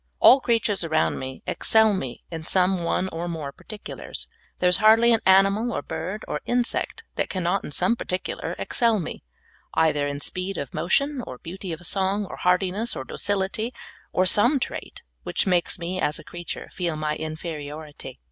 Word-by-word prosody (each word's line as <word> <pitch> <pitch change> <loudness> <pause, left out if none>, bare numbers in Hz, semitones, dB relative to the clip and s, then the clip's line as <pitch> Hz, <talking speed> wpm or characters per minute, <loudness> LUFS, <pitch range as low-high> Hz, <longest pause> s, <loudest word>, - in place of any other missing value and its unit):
All 265 - +8
creatures 225 -6 +2
around 155 -1 +1
me 130 0 -7
excel 220 -1 +4
me 135 -10 -4
in 165 -1 -5
some 185 +1 +2
one 180 +2 0
or 170 0 -4
more 160 -5 -4
particulars. 210 +8 -7 0.3
There 180 - +2
is 180 - +5
hardl}^ 225 +2 +6
an 225 - +3
animal, 195 +5 +5
or 145 - -3
bird, 185 +10 -5
or - - -3
insect, 245 0 -1
that - - 0
cannot 185 +1 0
in - - -7
some 235 +10 +2
particular 185 -5 -4
excel 230 -3 +2
me, 165 - -6 0.5
either 155 -3 +3
in 145 0 -3
speed 185 +5 -3
of 140 - -5
motion, 280 +8 +1
or 125 - -7
beauty 185 +5 -7
of 165 +2 -6
song, 195 +3 +1
or - - -8
hardiness, 190 +5 +1
or 130 - -4
docility, 205 - -1 0.4
or 185 - +2
some 240 +9 +5
trait, - - -5 0.2
which - - 0
makes 180 -3 +2
me 180 +2 -3
as 150 - +1
a - - -6
creature 175 0 -6
feel 170 -4 -2
ni}" 155 0 -1
inferiority. 155 -3 -6
185 Hz, 175 wpm, -25 LUFS, 160-210 Hz, 0.5 s, All